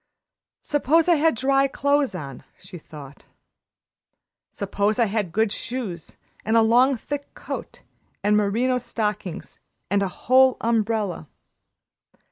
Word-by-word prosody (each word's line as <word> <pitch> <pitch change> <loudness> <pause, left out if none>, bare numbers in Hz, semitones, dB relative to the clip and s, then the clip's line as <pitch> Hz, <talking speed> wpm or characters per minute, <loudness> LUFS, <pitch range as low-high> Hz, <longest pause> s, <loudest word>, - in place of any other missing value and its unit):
"Suppose 305 +3 +2
I 345 -2 +5
had 320 0 +2
dry 275 +3 +2
clothes 280 -3 0
on," 140 -6 -8 0.2
she 180 - -11
thought. 145 -3 -13 1.3
"Suppose 200 +2 -1
I 235 - +3
had 205 -4 -2
good 220 +2 +1
shoes 220 -9 -5 0.3
and 220 +1 +2
a 225 - +5
long, 250 +4 +4
thick 285 +4 -6
coat - - -7 0.4
and 210 +1 +3
merino 230 +5 +1
stockings 210 -7 -4 0.3
and 200 0 +2
a 195 - +1
whole 260 +6 +3
umbrella. 220 -7 -1
225 Hz, 120 wpm, -23 LUFS, 200-260 Hz, 1.3 s, I